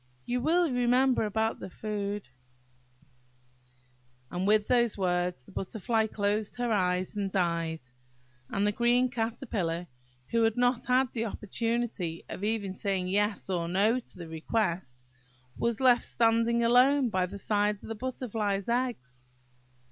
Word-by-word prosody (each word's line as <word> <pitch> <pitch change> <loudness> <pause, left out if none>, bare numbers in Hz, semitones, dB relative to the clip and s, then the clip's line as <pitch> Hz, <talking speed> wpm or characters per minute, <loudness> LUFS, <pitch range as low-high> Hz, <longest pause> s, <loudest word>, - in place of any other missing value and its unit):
you 245 0 -1
will 340 +5 +3
remember 250 0 +3
about 220 +2 -1
the - - -7
food–" 205 -1 -4 2.0
And 180 +2 -1
with 210 0 +4
these 240 -3 +2
words 180 -6 0
the - - -17
Butterfly 220 +3 -1
closed 210 0 -1
her 245 -1 -1
eyes 180 -1 0
and 200 -1 -1
died; 170 -4 0 0.7
and 200 +1 0
the 210 - +3
green 245 +3 +2
Caterpillar 220 -7 -2 0.5
who 230 - +2
had 225 0 +2
not 245 -1 +1
had 255 0 +3
the 230 -1 -2
opportunity 220 -5 -2
of 195 - -6
even 210 -3 -1
saying 190 -2 -2
Yes 205 +1 0
or 175 -3 -1
No 205 +8 +2
to 235 - -15
the 170 -2 -7
request, 160 - -2 0.5
was 235 -2 -1
left 250 -2 +5
standing 230 0 +2
alone 250 +3 +5
by 185 -3 0
the 200 +3 -8
side 205 +1 +1
of 195 - -19
the 225 - -3
Butterfly's 220 -4 -2
eggs. 235 - -2
215 Hz, 140 wpm, -29 LUFS, 185-240 Hz, 2.0 s, left